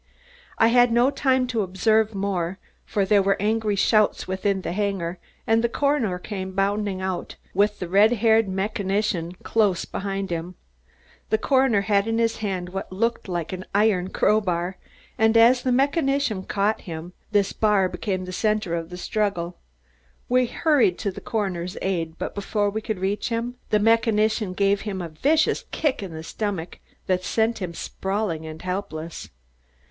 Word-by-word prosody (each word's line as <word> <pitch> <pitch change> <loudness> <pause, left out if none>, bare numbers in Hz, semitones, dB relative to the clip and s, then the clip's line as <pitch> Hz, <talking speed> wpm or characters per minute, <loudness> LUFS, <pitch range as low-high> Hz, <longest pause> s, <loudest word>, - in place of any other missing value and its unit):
I 225 - +5
had 245 0 +5
no 240 +4 +4
time 260 -3 +2
to 240 -3 -1
observe 215 +3 +1
more, 190 -2 -2 0.3
for 200 -2 0
there 200 +1 +4
were 195 0 +1
angry 215 0 +1
shouts 215 +2 +2
within 190 +1 -1
the - - -4
hangar 185 -3 -2 0.3
and 225 +1 +3
the 235 - +2
coroner 280 -9 +1
came 190 0 -6
bounding 195 -1 0
out, 185 -1 -3 0.2
with 205 +2 +2
the 180 - -5
red 205 +6 +5
haired 225 -1 +3
mechanician 195 -2 -1
close 205 -6 +1
behind 195 -1 -4
him. 170 +2 -4 0.7
The 220 - +3
coroner 260 -3 +3
had 200 0 +1
in 225 0 0
his 230 0 +1
hand 190 -4 -3
what 190 +1 -6
looked 230 +5 -1
like 175 -1 -3
an 185 0 -5
iron 205 -3 +3
crow 215 +2 +2
bar, 180 -1 -2 0.4
and 220 +1 +4
as 240 +2 +6
the 255 - 0
mechanician 275 - +1
caught 205 +2 0
him, 170 -1 -7 0.2
this 205 -2 +2
bar 210 -3 +3
became 185 -1 -3
the 185 - -6
center 210 -3 0
of 165 -1 -3
the 180 - -7
struggle. 180 -3 -2 0.7
We 250 0 +3
hurried 275 - +2
to 200 - -2
the - - -9
coroner's 190 -4 -3
aid, 165 -4 -2
but - - -4
before 205 0 -1
we 220 +2 -3
could 220 -2 -3
reach 195 +5 -1
him, 235 +1 -2 0.2
the 210 - +4
mechanician 220 -2 +2
gave 200 +1 +2
him 205 -3 -4
a 170 -2 -5
vicious 295 - +1
kick 295 -8 -1
in 190 -3 -6
the 160 0 -7
stomach 195 -2 -4 0.3
that 185 -1 0
sent 225 +3 0
him 170 -2 -4
sprawling 190 -5 -3
and 155 +1 -9
helpless. 170 -3 -5
200 Hz, 170 wpm, -24 LUFS, 185-220 Hz, 0.7 s, as